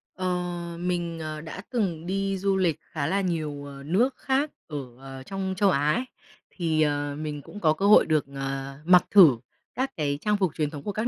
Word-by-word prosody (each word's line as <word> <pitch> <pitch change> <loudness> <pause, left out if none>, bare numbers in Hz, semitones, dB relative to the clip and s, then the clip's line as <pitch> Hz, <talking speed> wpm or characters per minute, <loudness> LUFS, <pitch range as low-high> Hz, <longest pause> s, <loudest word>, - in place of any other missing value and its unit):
Ờ, 185 0 -2 0.5
mình, 175 -2 -2
ờ, 155 -1 -5
đã 165 +4 -7
từng 185 -10 -1
đi 195 +1 -1
du 195 0 +1
lịch 175 -5 +2
khá 145 -3 -4
là 195 +4 +1
nhiều, 155 -6 -2
ờ, 140 -1 -9
nước 220 - +1
khác 275 +3 0 0.2
ở, 150 - -5 0.2
ờ, 135 0 -9
trong 190 +4 -3
châu 200 +1 +4
Á 145 -2 +2
ấy, 250 +3 -1 0.4
thì, 160 -3 0
ờ, 145 -1 0
mình 150 -1 -4
cũng 205 +9 -10
có 155 -5 +3
cơ 195 +5 -2
hội 210 - +7
được, 155 -2 +1
ờ, 135 0 -4
mặc 180 +1 +6
thử 170 - +8 0.4
các 260 +1 -1
cái 145 -2 -1
trang 210 0 +1
phục 190 -6 0
truyền 150 -2 0
thống 145 -2 -8
của 205 - -2
các 215 +4 -1
165 Hz, 210 wpm, -26 LUFS, 145-195 Hz, 0.5 s, thử